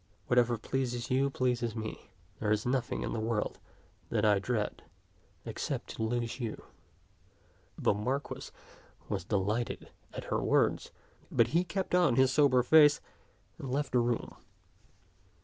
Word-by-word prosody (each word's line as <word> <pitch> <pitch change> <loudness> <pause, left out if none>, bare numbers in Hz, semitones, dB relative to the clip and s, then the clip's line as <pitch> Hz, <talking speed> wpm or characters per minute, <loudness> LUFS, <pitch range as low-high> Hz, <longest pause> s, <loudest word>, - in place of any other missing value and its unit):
Whatever 120 -1 +3
pleases 125 +1 -2
you 135 +2 +3
pleases 125 -4 -1
me. 110 -1 -6 0.3
There 105 - 0
is 105 0 +1
nothing 125 0 -1
in - - -3
the 115 - -2
world 110 -1 -1 0.5
that 110 -2 +1
I 105 -2 +4
dread 105 0 -2 0.6
except - - -4
to - - -7
lose 120 +2 -1
you." 115 -3 -4 1.1
The - - +2
Marquis 125 +8 -3 0.6
was - - -2
delighted 105 +5 -2 0.2
at - - -6
her - - +2
w^ords, - - +2 0.4
but 115 -1 +3
he 170 +6 +2
kept 185 +1 -3
on 175 -9 +4
his 130 0 +4
sober 135 -4 +4
face, 150 +2 +6 0.6
and 135 - -6
left 140 +2 -1
the 125 - +3
room. 120 -1 -1
120 Hz, 140 wpm, -31 LUFS, 110-135 Hz, 1.1 s, face